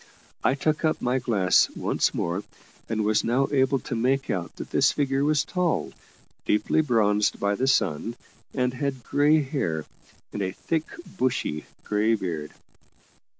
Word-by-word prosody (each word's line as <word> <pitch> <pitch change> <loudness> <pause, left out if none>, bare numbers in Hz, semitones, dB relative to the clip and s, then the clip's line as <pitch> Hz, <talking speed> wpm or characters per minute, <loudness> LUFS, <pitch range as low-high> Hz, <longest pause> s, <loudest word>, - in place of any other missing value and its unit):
I - - +3
took 155 +3 0
up 155 - +1
my 125 +2 0
glass 105 -7 +3
once - - +1
more, 85 +4 -2 0.5
and 110 -1 0
was 105 0 +2
now 130 +4 +2
able 135 -1 +3
to 120 - -4
make 130 +4 +1
out 85 -3 -3
that - - -8
this - - +4
figure 135 -1 0
was 150 0 +2
tall, 180 -3 -1 0.5
deeply 105 +8 +2
bronzed 105 -7 +2
by 100 0 +1
the 130 +6 0
sun, 115 - +1 0.4
and 125 -2 0
had 135 -1 -3
grey 150 +4 +3
hair 90 - -2 0.5
and 105 - -3
a 95 -1 -2
thick 160 +8 -2 0.2
bushy 125 - -2 0.2
grey 105 +2 +2
beard. 85 -7 -4
125 Hz, 150 wpm, -25 LUFS, 105-140 Hz, 0.5 s, this